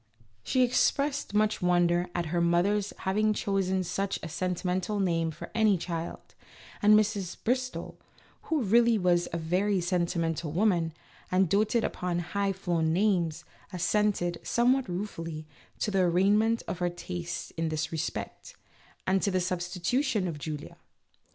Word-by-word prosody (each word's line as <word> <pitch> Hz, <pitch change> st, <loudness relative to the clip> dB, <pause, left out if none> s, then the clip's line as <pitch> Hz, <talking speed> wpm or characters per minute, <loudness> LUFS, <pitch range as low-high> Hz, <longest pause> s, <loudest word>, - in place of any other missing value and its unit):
She 255 Hz, -, +2 dB
expressed 275 Hz, 0 st, +1 dB
much 215 Hz, 0 st, +2 dB
wonder 175 Hz, 0 st, +2 dB
at 175 Hz, -1 st, 0 dB
her 175 Hz, -, +2 dB
mother's 190 Hz, +4 st, +2 dB
having 215 Hz, +3 st, +2 dB
chosen 190 Hz, -2 st, 0 dB
such 190 Hz, +3 st, -2 dB
a 165 Hz, -, -5 dB
sentimental 185 Hz, +4 st, -2 dB
name 165 Hz, -4 st, +1 dB
for 160 Hz, +1 st, -9 dB
any 215 Hz, -3 st, +3 dB
child, 170 Hz, -1 st, -5 dB, 0.5 s
and 210 Hz, +1 st, +7 dB
Mrs. 200 Hz, -4 st, 0 dB
Bristol, 255 Hz, +2 st, -2 dB, 0.5 s
who 310 Hz, -5 st, +1 dB
really 230 Hz, +2 st, +4 dB
was 175 Hz, -2 st, +2 dB
a 170 Hz, -, -2 dB
very 185 Hz, +5 st, +1 dB
sentimental 170 Hz, -3 st, -1 dB
woman 170 Hz, -3 st, +1 dB, 0.4 s
and 185 Hz, +1 st, +3 dB
doted 215 Hz, +5 st, +2 dB
upon 180 Hz, -1 st, -2 dB
high 195 Hz, +3 st, -1 dB
flown 175 Hz, -4 st, 0 dB
names, 175 Hz, -3 st, +1 dB, 0.3 s
assented, 180 Hz, -2 st, 0 dB
somewhat 250 Hz, 0 st, +2 dB
ruefully, 165 Hz, -4 st, -5 dB, 0.3 s
to 210 Hz, -, -1 dB
the 195 Hz, -, +1 dB
arraignment 205 Hz, +6 st, +3 dB
of 180 Hz, -, -4 dB
her 175 Hz, 0 st, +1 dB
taste 175 Hz, 0 st, -5 dB
in 165 Hz, 0 st, -1 dB
this 155 Hz, 0 st, -2 dB
respect, 160 Hz, -2 st, -5 dB, 0.5 s
and 190 Hz, 0 st, +2 dB
to -, -, +1 dB
the 185 Hz, -1 st, +1 dB
substitution 185 Hz, +6 st, -1 dB
of 160 Hz, -4 st, -5 dB
Julia. 150 Hz, 0 st, -6 dB
185 Hz, 140 wpm, -29 LUFS, 170-210 Hz, 0.5 s, and